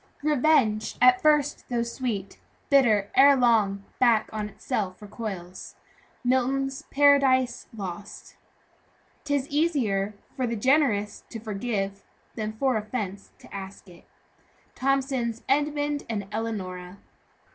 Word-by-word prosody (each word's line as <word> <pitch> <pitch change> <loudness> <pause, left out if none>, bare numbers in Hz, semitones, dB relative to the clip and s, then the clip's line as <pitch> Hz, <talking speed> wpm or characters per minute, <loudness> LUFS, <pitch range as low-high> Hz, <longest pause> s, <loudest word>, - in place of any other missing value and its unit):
"Revenge, 285 -7 +2
at 250 0 +6
first 300 -1 +2
though 240 -1 0
sweet, 235 -5 -4 0.3
Bitter, 220 -8 +4
ere 280 +1 +7
long, 220 -6 +2 0.2
back 230 -3 +3
on 210 -1 -3
itself 190 -2 -3
recoils." 200 -4 -7 0.5
MILTON'S 265 +2 0
PARADISE 270 -3 +3
LOST. 195 +1 -8 0.9
"Tis 285 -2 -1
easier 240 - 0 0.2
for 255 -2 -1
the 235 - -2
generous 235 -4 +1
to 225 - -7
forgive, 200 -2 -3 0.3
Than 215 -1 -4
for 255 +1 +1
offence 210 -3 -5
to - - -16
ask 195 0 -8
it." 175 -1 -17 0.7
THOMSON'S 260 -4 -1
EDMUND 290 +1 0
AND 205 -3 -3
ELEONORA. 195 -4 -5
235 Hz, 110 wpm, -26 LUFS, 205-270 Hz, 0.9 s, ere